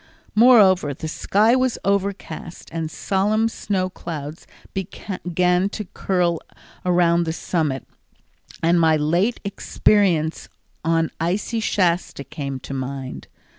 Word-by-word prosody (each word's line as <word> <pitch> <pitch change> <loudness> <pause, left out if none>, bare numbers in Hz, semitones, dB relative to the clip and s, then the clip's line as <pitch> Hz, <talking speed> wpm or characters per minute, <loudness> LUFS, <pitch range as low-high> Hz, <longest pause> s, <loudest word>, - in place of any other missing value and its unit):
Moreover, 195 - +6
the 160 - -5
sky 210 +8 +2
was 255 -1 +1
overcast 200 -3 -3
and 165 -1 -2
solemn 205 +6 +1
snow 195 -4 -1
clouds 160 -4 -7 0.3
began 180 -1 -1
to 210 +1 -5
curl 175 -3 0 0.4
around 175 -1 +3
the 160 - -1
summit, 155 -6 -2 0.8
and 170 +1 +4
my 160 -1 +5
late 175 +10 +1
experiences 190 -5 +1 0.3
on 165 0 +1
icy 190 +7 -1
Shasta 180 -8 0
came 140 -1 -5
to 135 - -7
mind. 135 0 -5
175 Hz, 110 wpm, -22 LUFS, 160-200 Hz, 0.8 s, Moreover